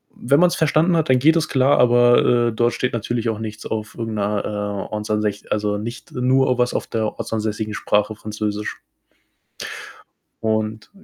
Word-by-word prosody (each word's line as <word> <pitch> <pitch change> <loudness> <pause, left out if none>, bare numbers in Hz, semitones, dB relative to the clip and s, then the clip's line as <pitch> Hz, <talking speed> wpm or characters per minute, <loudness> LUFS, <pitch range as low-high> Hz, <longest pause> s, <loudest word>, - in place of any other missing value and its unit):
Wenn 140 +5 +2
man's 180 0 +4
verstanden 160 +3 +2
hat, 155 -4 0
dann 130 - +5
geht 160 +5 +4
das 160 -2 +1
klar, 135 +1 +3
aber, 120 0 +4
äh, - - -5
dort 120 +2 +1
steht 125 - -2
natürlich 115 0 -2
auch 110 -1 -3
nichts 110 -1 -7
auf 110 +1 -4
irgend 115 -2 -4
'ner, 105 0 -1
äh, 105 0 -4
ortsansäs 105 -1 -2
also, 105 -1 0
nicht, 115 +4 -7
äh, 125 - -5
nur 130 0 +3
was 125 0 +2
auf - - -2
der 110 -1 -1
ortsansässigen 110 -1 -3
Sprache, 105 +2 0
Französisch. 105 0 -4 1.6
Und 110 0 -2
110 Hz, 170 wpm, -21 LUFS, 105-125 Hz, 1.6 s, dann